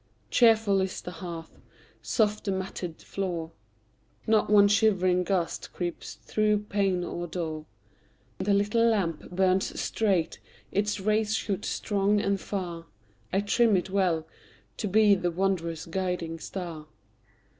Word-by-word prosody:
Cheerful 220 -4 +4
is 190 0 -2
the 180 - -7
hearth, 170 -1 -8 0.4
soft 215 -2 0
the 200 - 0
matted 190 -3 -5
floor; 175 -4 -3 0.7
Not 220 -2 +3
one 205 -1 +7
shivering 190 -4 +3
gust 180 -3 -2
creeps 175 -2 -5
through 210 -1 0
pane 195 -3 +1
or 175 0 -4
door; 160 -2 -4 0.7
The 200 +1 +2
little 210 +3 +2
lamp 195 -9 +1
burns 185 +1 +1
straight, 190 -7 0 0.3
its 205 +1 0
rays 215 +2 +1
shoot 200 -1 -2
strong 205 0 +1
and 200 -1 0
far: 175 -4 -5 0.4
I 195 - +2
trim 215 0 +3
it 185 +1 -3
well, 180 -5 +1 0.5
to 210 - -2
be 210 +1 +5
the 185 -2 +1
wanderer's 170 -2 -1
guiding 170 -2 -3
star. 165 -4 -6
190 Hz, 130 wpm, -28 LUFS, 175-205 Hz, 0.7 s, one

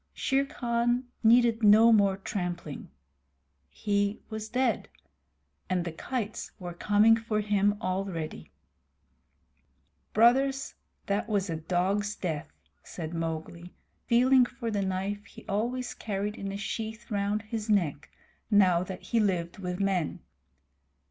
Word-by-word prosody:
Shere 275 +1 +1
Khan 240 -2 0 0.2
needed 235 0 +5
no 220 +2 +7
more 200 -3 +4
trampling. 175 -6 -5 0.8
He 205 0 -1
was 220 0 -5
dead, 250 0 0 0.8
and 180 -2 0
the 170 - -3
kites 220 +5 -4
were 175 -3 -6
coming 210 +5 +4
for 225 -1 -2
him 205 0 +2
already. 185 -5 -3 1.6
"Brothers, 265 +4 +3 0.3
that 200 +3 -1
was 200 -4 0
a - - -1
dog's 190 +5 0
death," 160 -5 -3 0.4
said 165 -1 -7
Mowgli, 165 +1 -5 0.3
feeling 255 +1 +5
for 230 -2 -5
the 205 -2 0
knife 195 +2 -2
he - - -14
always 240 +5 -2
carried 205 0 -3
in 195 0 -5
a 195 - -4
sheath 220 +3 -5
round 205 +1 0
his 220 0 -5
neck 170 -9 +1 0.4
now 185 -5 +5
that 185 0 -6
he 235 - 0
lived 180 -3 0
with 180 -1 -4
men. 190 -5 0
205 Hz, 125 wpm, -28 LUFS, 185-225 Hz, 1.6 s, no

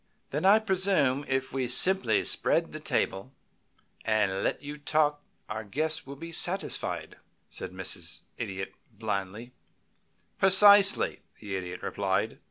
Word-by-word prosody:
"Then 150 +6 -2
I 200 +3 +7
presume 190 -10 +1
if 130 0 -2
we 130 -2 -1
simply 125 - +3
spread - - 0
the - - -7
table 95 +8 -2 0.7
and 105 -3 0
let - - -2
you 145 +1 -7
talk 150 0 +1 0.3
our 110 +1 -5
guests 155 +9 -2
will 140 - -8
be 165 +4 -9
satisfied?" 180 +3 -2 0.3
said - - -5
Mrs. 90 -2 -6
Idiot, 95 -4 -5 0.2
blandly. 105 +2 -5 0.9
"Precisely," 200 +1 +6 0.2
the 100 -3 -5
Idiot 90 -1 -6
replied. - - -2
130 Hz, 125 wpm, -28 LUFS, 105-165 Hz, 0.9 s, I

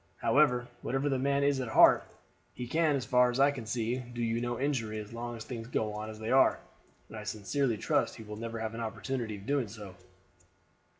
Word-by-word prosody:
However, 125 -4 +3
whatever 135 +3 -1
the 135 -2 0
man 140 +1 +1
is 140 -1 +2
at 130 - -2
heart, 110 - +6 0.5
he 125 - -5
can, 160 +3 +2
as 130 -3 -2
far 125 -1 +4
as 125 +2 -2
I 140 +1 +5
see, 115 +1 -1
do 120 -1 -5
you 115 0 0
no 120 0 -2
injury 125 -6 -1
as 105 +1 -7
long 120 0 -5
as 110 - -8
things 115 -3 -6
go 110 -3 -1
on 105 +1 -5
as 110 - -8
they 110 +1 -4
are, 130 0 +5 0.5
and - - -11
I 105 - -6
sincerely 110 +4 -1
trust - - 0
he 110 - -9
will 105 0 -8
never 115 +1 -5
have 110 0 -3
an 115 - -5
opportunity 115 0 -3
of 100 - -12
doing 140 -3 0
so." 105 -2 -9
120 Hz, 220 wpm, -31 LUFS, 110-135 Hz, 0.5 s, heart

